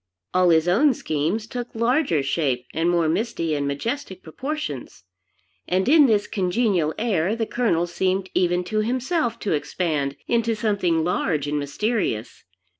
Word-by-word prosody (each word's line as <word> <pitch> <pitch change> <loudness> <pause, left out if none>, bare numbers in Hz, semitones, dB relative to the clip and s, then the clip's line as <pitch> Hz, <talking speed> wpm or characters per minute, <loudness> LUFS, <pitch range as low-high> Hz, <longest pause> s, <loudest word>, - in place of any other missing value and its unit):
All 185 -1 +4
his 160 0 +4
own 255 +9 +4
schemes 160 +8 -1
took 245 +1 -5
larger 235 - +2
shape 135 -4 -1
and 165 +2 +1
more 170 -2 +2
misty 165 -2 -1
and 145 -1 -1
majestic 190 - -4
proportions; 215 - -5 0.6
and 185 +1 +1
in 295 0 +7
this 210 -3 +2
congenial 185 -4 0
air, 205 -3 0
the 230 -1 -1
Colonel 210 -9 +1
seemed 185 +2 -1
even 180 0 +1
to 215 +4 -2
himself 250 +2 0
to 205 - -2
expand 150 -2 -1
into 230 -1 +1
something 195 -7 +1
large 160 -4 0
and 145 0 -1
mysterious. 145 - -2
185 Hz, 145 wpm, -23 LUFS, 160-230 Hz, 0.6 s, in